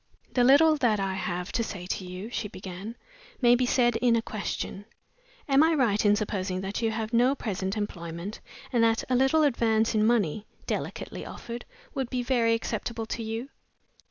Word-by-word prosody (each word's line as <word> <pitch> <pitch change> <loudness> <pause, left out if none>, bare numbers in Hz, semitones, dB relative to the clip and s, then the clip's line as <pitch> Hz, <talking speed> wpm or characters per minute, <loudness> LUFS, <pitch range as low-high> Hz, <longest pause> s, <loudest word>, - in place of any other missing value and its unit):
"The 250 - +3
little 305 +5 +6
that 230 -7 +2
I 195 -1 -1
have 180 -1 -3
to 230 - 0
say 185 -5 -6
to 190 - -3
you," 185 +5 -7
she 220 - -2
began, 190 +3 -8 0.4
"may 240 -2 +6
be 245 +1 +2
said 240 -2 +3
in 235 0 +3
a 230 - +2
question. 205 -1 -4 0.6
Am 275 0 +5
I 320 +1 +4
right 230 -8 +2
in 205 -1 +5
supposing 195 -3 -2
that 195 +3 -3
you 225 - +2
have 220 +1 -3
no 250 +4 +4
present 195 -4 -3
employment, 175 -1 -5 0.3
and 235 -2 +4
that 225 0 +3
a - - +4
little 270 +5 +4
advance 230 -5 +2
in 215 -1 +3
money 215 -4 +1 0.2
(delicately - - -4
offered) 240 0 -7 0.3
would 265 -3 -2
be 250 -1 -1
very 235 -2 +2
acceptable 230 0 -3
to 230 - -4
you?" 225 +4 -4
225 Hz, 185 wpm, -27 LUFS, 200-245 Hz, 0.6 s, little